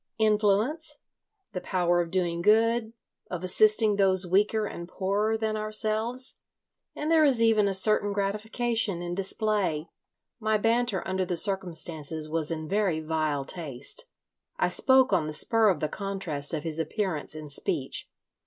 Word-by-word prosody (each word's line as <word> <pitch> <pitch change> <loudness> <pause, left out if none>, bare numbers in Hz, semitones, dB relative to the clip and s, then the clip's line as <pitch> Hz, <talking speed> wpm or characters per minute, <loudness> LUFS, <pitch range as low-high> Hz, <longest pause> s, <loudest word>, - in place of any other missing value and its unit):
Influence, 220 +8 +1 0.6
the 180 - -4
power 175 -2 +1
of 170 - -4
doing 170 -2 -1
good, 225 +3 +2 0.4
of 180 -1 -5
assisting 215 +2 +4
those 190 -2 +3
weaker 210 +4 +1
and 170 -4 -7
poorer 205 +4 -1
than 220 -1 -2
ourselves; 220 +4 0 0.6
and 305 +2 -3
there 320 -1 +5
is 270 -5 +3
even 225 -3 +3
a 195 - -1
certain 205 +2 +4
gratification 210 -1 -2
in 175 0 -4
display..... 195 -4 -2 0.2
" - - -59
My 220 -1 +1
banter 225 -2 0
under 190 0 -1
the 175 -1 -2
circumstances 165 -5 0
was 155 -1 -2
in 160 -1 -4
very 195 -4 0
vile 155 -3 -2
taste. 165 - -4 0.5
I - - +1
spoke 260 -1 +3
on 155 - +1
the 155 - -5
spur 225 +7 +3
of 175 -6 -1
the 155 - 0
contrast 185 -6 -3
of 150 - -5
his 160 -1 -3
appearance 160 -3 -3
and 155 -2 -9
speech. 135 -1 -2
195 Hz, 155 wpm, -27 LUFS, 170-220 Hz, 0.6 s, there